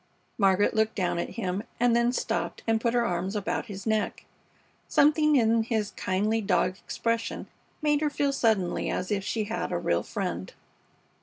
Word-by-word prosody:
Margaret 195 0 +3
looked 220 0 +1
down 180 -3 0
at - - -4
him, 190 -3 -1 0.2
and 240 0 +4
then 235 0 +3
stooped - - -2
and 225 -1 +1
put 235 0 +1
her 240 -1 +3
arms 180 +1 -2
about 205 - -2
his 195 -1 -8
neck. 220 -2 -1 0.6
Something 305 +1 +4
in 230 -3 +4
his 220 -2 -1
kindly 210 +4 0
dog 190 -2 +1
expression 230 0 -2 0.4
made 295 -1 +2
her 305 - +2
feel 285 -1 0
suddenly 220 -9 +1
as 185 - -2
if 200 -2 0
she 220 +2 -1
had 220 +2 -3
a - - 0
real - - +1
friend. - - -4
220 Hz, 170 wpm, -27 LUFS, 195-235 Hz, 0.6 s, and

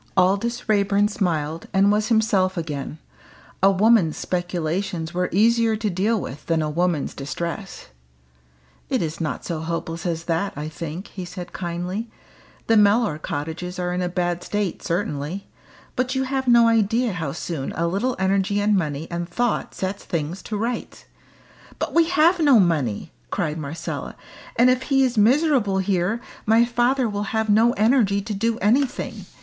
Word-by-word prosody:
Aldous 200 +6 +1
Raeburn 205 -1 +3
smiled, 165 -6 -2
and 195 +1 +4
was 210 +1 +1
himself 205 -5 +2
again. 150 -3 -4 0.6
A 195 - +6
woman's 195 -4 +3
speculations 175 -1 -2
were 180 +1 0
easier 225 +2 +3
to 215 -1 -2
deal 205 +5 +1
with 145 -5 -8
than 165 -2 +1
a 150 - -2
woman's 170 -2 0
distress. 170 +7 -5 1.0
"It - - +1
is 160 +1 -4
not 155 - -3
so 170 -3 -3
hopeless 165 +1 -4
as 165 -1 -2
that, 170 +4 -1
I 150 +2 -4
think," 165 +4 -6
he 185 - -7
said 180 0 -8
kindly. 180 +5 -4 0.6
"The 225 - +4
Mellor 205 -5 +3
cottages 160 +5 -5
are 180 0 -2
in 180 - -1
a 180 - -1
bad 175 -1 -1
state 205 -4 -2
certainly. 170 -1 -3 0.5
But 255 +1 -1
you 265 - +1
have 265 0 -2
no 235 -1 +6
idea 230 +1 +2
how 175 -2 -3
soon 160 -4 -4
a 165 - -1
little 200 +9 0
energy 195 +1 +1
and 205 0 +2
money 155 -3 -2
and 170 0 -3
thought 240 +5 -1
sets 190 +1 -3
things 165 +3 -3
to 215 - -2
rights." 230 +3 -4 0.7
"But - - -3
we 335 0 +5
have 345 +1 +4
no 285 -7 +6
money!" 150 - 0 0.2
cried 155 +1 -2
Marcella. 155 +3 -5 0.4
"And 250 +2 +5
if 255 0 +1
he 270 -1 +4
is 255 -2 +1
miserable 240 -2 +3
here, 190 +3 0 0.3
my 225 +2 +5
father 245 +2 +1
will 205 +1 -3
have 220 -1 +1
no 225 +3 +5
energy 215 -3 +3
to 210 +2 -5
do 225 +3 0
anything. 250 +6 0
195 Hz, 165 wpm, -23 LUFS, 170-225 Hz, 1.0 s, A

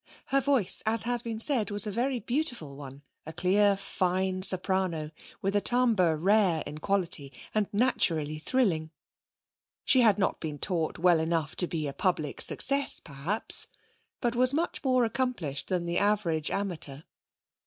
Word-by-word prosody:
Her 275 0 +2
voice, 265 -8 +2
as 225 +1 +3
has 240 0 +1
been 230 -2 -6
said, 235 -3 +3
was 205 0 +4
a 210 - -3
very 245 +4 -2
beautiful 240 - -3
one, 140 0 -11 0.2
a - - -6
clear, 195 +4 +1
fine 185 -1 -2
soprano, 185 -4 +1 0.3
with 195 +1 -1
a 205 - +2
timbre 220 -11 +2
rare 185 -1 +2
in 150 - -8
quality, 170 -7 0 0.2
and 215 -2 0
naturally 165 - 0
thrilling. 170 -7 -1 1.0
She 260 - +5
had 215 -4 +3
not 195 - -1
been 150 -2 -6
taught 165 0 -2
well 175 -1 +3
enough 160 -1 -2
to 180 - +2
be 155 -3 -4
a 140 - -6
public 155 -5 -2
success 280 +1 +5
perhaps, 155 +8 0 0.5
but 240 -1 -1
was 255 +3 +3
much 335 +1 -3
more 255 -3 +2
accomplished 220 - -3
than 180 -2 -2
the 170 0 -1
average 195 -7 0
amateur. 170 -8 -4
190 Hz, 155 wpm, -27 LUFS, 160-230 Hz, 1.0 s, She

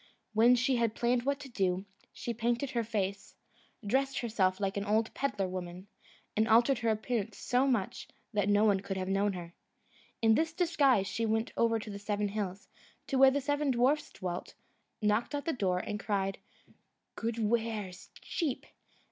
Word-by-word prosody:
When 235 +3 +6
she 255 +1 +2
had 230 -2 +1
planned 240 +1 +1
what 280 0 +1
to 280 - -8
do, 190 -5 -1 0.3
she 235 - -4
painted 240 +4 -1
her 235 -1 0
face, 200 -3 -3 0.5
dressed 270 +5 +1
herself 195 -5 +1
like 195 -1 -1
an 200 - -1
old 215 +2 +1
pedlar 210 -9 -1
woman, 180 0 -6 0.5
and 220 +1 +2
altered 235 +3 +4
her 230 -1 0
appearance 220 -1 -1
so 255 +2 +1
much, 230 -8 -1 0.3
that 205 -1 +1
no 205 +1 +4
one 200 -3 +4
could 195 0 -4
have 185 0 -3
known 195 +1 +1
her. 175 -2 -7 0.7
In 225 -1 +4
this 320 +6 +1
disguise 290 - +3
she 230 +3 -2
went 220 +1 0
over 230 -1 +2
the 210 -2 -6
seven 205 0 -1
hills, 200 -2 -4 0.4
to 270 - 0
where 270 0 +9
the 285 +2 0
seven 290 +1 0
dwarfs 265 +4 +2
dwelt, 180 -2 -5 0.5
knocked 210 +7 +1
at 285 - -3
the 330 - 0
door, 190 -7 0
and 210 +3 -3
cried, 195 -3 -1 0.8
"Good 230 0 -2
wares, 220 -4 -2
cheap! 300 -7 -2
220 Hz, 175 wpm, -31 LUFS, 200-250 Hz, 0.8 s, where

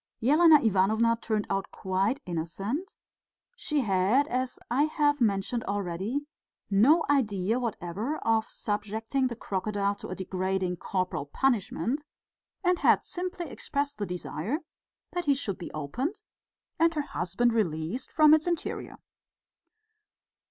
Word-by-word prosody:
Elena 305 +4 +7
Ivanovna 220 0 +3
turned 215 -2 -1
out 195 0 -1
quite 195 +8 -1
innocent; 195 - -3 0.6
she 300 - 0
had, 210 +6 +2
as 255 +1 -1
I 275 +5 +4
have 290 -2 +1
mentioned 215 +2 +1
already, 200 +6 -2 0.5
no 275 +12 +5
idea 225 -5 +1
whatever 225 - -3
of 225 -1 +1
subjecting 220 +5 -2
the 240 - -5
crocodile 200 -1 -1
to - - -8
a 185 - -5
degrading 185 -1 -2
corporal 185 -7 -2
punishment, 245 - 0 0.6
and 360 -1 +2
had - - +4
simply 360 -1 -4
expressed 285 -1 -3
the 205 - -2
desire 180 - -3 0.5
that 355 -1 -3
he 285 -1 +4
should 205 -8 -2
be 175 - -7
opened 245 - -3 0.6
and 330 0 +4
her 300 - +1
husband 230 +2 0
released 180 - -1
from 305 -1 +6
his 315 +2 +3
interior. 345 -2 -3
225 Hz, 125 wpm, -28 LUFS, 190-285 Hz, 0.6 s, Elena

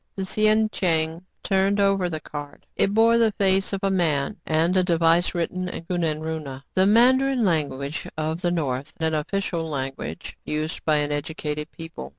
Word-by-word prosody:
The 195 - -3
sien 215 +2 +3
cheng 165 -1 0 0.2
turned 195 +1 +2
over 195 -2 +2
the 160 -2 -4
card. 145 -1 -9
It 195 - +2
bore 230 +2 +4
the 225 -2 +3
face 195 -1 +2
of 195 -1 -3
a 195 - +2
man, 165 -2 +1
and 165 +3 +2
a 185 - +5
device 170 0 +2
written 180 +2 -2
in 170 - -6
kunan 165 -3 -1
runa, 150 -4 -5
the 185 +1 +3
mandarin 255 +3 +4
language 145 -4 -1
of 155 +2 -2
the 175 - +1
north 145 -3 -2
and 160 0 0
an 155 - +2
official 170 -2 -3
language 135 - -5
used 155 +1 -3
by 150 -2 +3
educated 150 +1 -3
people. 165 - -8
165 Hz, 170 wpm, -24 LUFS, 155-195 Hz, 0.2 s, a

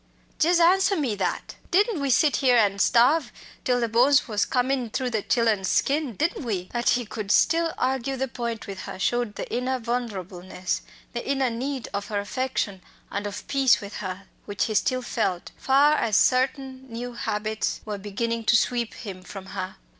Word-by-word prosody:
jes' 345 +2 +4
answer 380 +4 +4
me 275 - 0
that! 190 -4 -3 0.2
Didn't 400 -2 +2
we 280 - 0
sit 285 +4 +4
here 255 -3 +4
an' 200 -3 +3
starve, 250 +7 +4 0.3
till 250 -1 +2
the 235 - +1
bones 250 +5 +4
was 210 -3 0
comin' 255 -1 0
through 250 +2 -2
the 220 -2 0
chillen's 220 -4 +1
skin? 280 -4 +1
didn't 315 - -1
we?" 190 -7 -3
That 240 0 +1
he 245 -1 +2
could 210 -1 -6
still 330 +6 +3
argue 265 +1 -1
the 265 +1 -1
point 235 -2 -4
with 195 -2 -7
her - - -7
showed 240 +2 0
the - - -5
inner 255 +1 -1
vulnerableness, 190 -7 -3 0.3
the 240 - -3
inner 270 -3 +1
need 260 +2 -3
of 200 0 -3
her 205 -2 -1
affection 205 -3 -2 0.3
and 205 +1 -2
of 205 - -7
peace 265 -6 +4
with 205 0 -8
her, 185 -1 -5 0.2
which 205 -1 -1
he 220 - -3
still 255 +5 +1
felt, 190 -7 -2
far 280 +3 +4
as 215 -3 +2
certain 265 0 +1
new 245 +2 -5
habits 215 -1 -2
were 210 -2 -4
beginning 230 +3 -2
to 235 - +5
sweep 235 0 -1
him 190 -3 -8
from 190 +1 -9
her. 190 -1 -5
235 Hz, 185 wpm, -25 LUFS, 205-265 Hz, 0.3 s, to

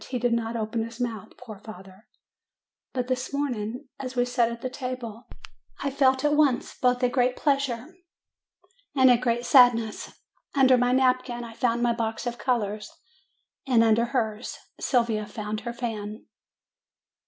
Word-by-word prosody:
He 255 - -2
did 245 0 +1
not 230 0 -1
open 225 +1 -2
his 230 +1 -9
mouth, 230 -5 -4
poor 220 -5 -10
father! 195 -1 -13 0.8
But 250 -1 -2
this 255 0 -2
morning, 255 -2 -3
as 260 -1 -6
we 245 0 +2
sat 245 -2 +1
at 235 0 -7
the 255 - -3
table, 250 -3 -6 0.6
I 280 - -1
felt 265 -1 +3
at 295 - +3
once 290 -5 +2
both 250 0 +1
a - - +5
great 250 0 +1
pleasure 275 -5 0 1.1
and 260 -2 +6
a 245 - +5
great 240 -1 0
sadness: 240 -5 +4 0.4
under 260 -2 +6
my 245 0 +2
napkin 255 -1 +1
I 230 -1 -9
found 240 0 0
my 240 -1 +3
box 225 0 -3
of 240 0 -4
colors, 210 -4 -1 0.8
and 240 -3 +5
under 225 +1 +4
hers, 230 -3 -2 0.2
Sylvia 230 -5 +1
found 210 0 -4
her 235 - -5
fan. 215 -2 -5
240 Hz, 155 wpm, -26 LUFS, 225-255 Hz, 1.1 s, and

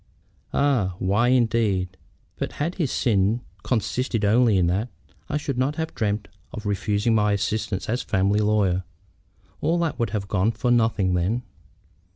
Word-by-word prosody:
"Ah! 120 -11 +1
why, 100 +6 +2
indeed. 110 -7 +1 0.4
But - - -4
had 160 +5 -2
his 145 - 0
sin 105 +1 +1 0.2
consisted 120 -1 -1
only 110 0 +4
in 90 - +3
that, 95 +8 0 0.4
I 150 - 0
should 140 -4 -3
not 135 +3 +1
have 160 0 -3
dreamed 105 -2 -1 0.2
of 110 -2 -7
refusing 105 +2 0
my 105 -1 +3
assistance 105 -1 -2
as 120 +3 -1
a - - -11
family 100 +2 +2
lawyer. 105 -4 +2 0.8
All 165 +3 +2
that 170 -2 -1
would 115 -2 0
have 100 -1 -3
gone 100 +3 +1
for 125 0 0
nothing 110 -6 +2
then." 95 +8 0
110 Hz, 160 wpm, -24 LUFS, 100-125 Hz, 0.8 s, only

